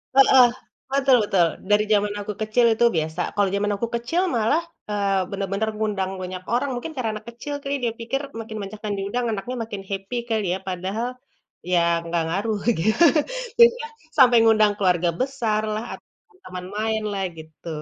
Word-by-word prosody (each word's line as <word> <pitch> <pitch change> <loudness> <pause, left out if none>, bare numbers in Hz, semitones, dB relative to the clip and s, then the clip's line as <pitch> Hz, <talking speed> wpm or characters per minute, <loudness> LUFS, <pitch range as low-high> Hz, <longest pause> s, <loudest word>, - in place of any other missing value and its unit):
Heeh, 265 -1 +7 0.5
betul 270 -1 +4
betul, 185 -4 +3 0.2
dari 210 +1 +5
zaman 205 0 +2
aku 205 +1 -4
kecil 215 +3 +2
itu 235 - +3
biasa. 160 +2 -1
Kalau 205 -1 +3
zaman 205 +1 0
aku 235 - -1
kecil 240 +10 0
malah, 230 +8 +2 0.3
eee, 200 -2 +1
bener-bener 200 +2 -2
mengundang 205 -3 -1
banyak 185 0 -6
orang 250 +4 +1
mungkin 245 +7 -5
karena 250 -4 -1
anak 215 - -8
kecil 265 +5 -7
kali 275 +1 -1
dia 235 -2 0
pikir 235 +4 -3 0.2
makin 220 -1 -6
banyak 205 +2 -8
yang 205 - -1
diundang 220 +5 -2
anaknya 220 +4 -4
makin 205 -3 -6
happy 195 +4 -5
kali 220 -3 0
ya, 190 - -3
padahal 190 +6 -2 0.6
ya 180 - +4 0.2
nggak 170 0 -1
ngaruh 205 +6 -1 0.2
gitu, 220 - +3 0.6
jadi 470 0 +10
ya - - -5 0.3
sampai 245 -3 +7
mengundang 215 -2 +5
keluarga 180 -3 +2
besar 240 -5 0
lah 215 +1 -3
atau 440 -3 -25
teman 180 0 -7
main 220 0 -1
lah, 195 -1 -2
gitu. 160 +1 -13
215 Hz, 175 wpm, -23 LUFS, 195-235 Hz, 0.6 s, jadi